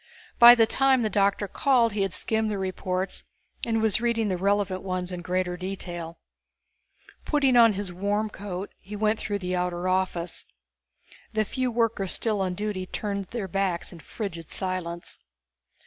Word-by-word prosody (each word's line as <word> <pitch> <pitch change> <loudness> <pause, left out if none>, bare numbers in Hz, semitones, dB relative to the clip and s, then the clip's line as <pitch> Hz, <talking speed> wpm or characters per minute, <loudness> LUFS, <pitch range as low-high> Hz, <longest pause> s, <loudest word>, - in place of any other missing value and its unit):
By 240 0 +11
the 225 -2 +5
time 265 +1 +3
the 215 - 0
doctor 200 +1 +2
called 240 0 +2
he 205 - -1
had 195 -1 0
skimmed 220 +3 0
the 210 - -2
reports 185 0 -3 0.4
and 225 -1 +1
was 220 0 +3
reading 230 -3 +1
the 185 - 0
relevant 195 0 0
ones 185 -1 -3
in 180 -1 -5
greater 180 0 -1
detail. 175 -3 -6 1.1
Putting 275 -4 +2
on 230 -2 +7
his 195 -2 -4
warm 205 +4 0
coat, 195 -1 -6
he 205 +3 -9
went 215 +1 +1
through 205 -1 -2
the 180 -2 -3
outer 180 0 -1
office. 185 -2 -1 0.9
The 215 0 +1
few 255 +3 -1
workers 230 -5 0
still 215 -3 -1
on 185 -1 -1
duty 205 -2 -3
turned 200 -1 -3
their 220 0 -4
backs 185 -1 -1
in 170 - -11
frigid 165 -1 -6
silence. 180 -2 -4
195 Hz, 165 wpm, -26 LUFS, 185-220 Hz, 1.1 s, By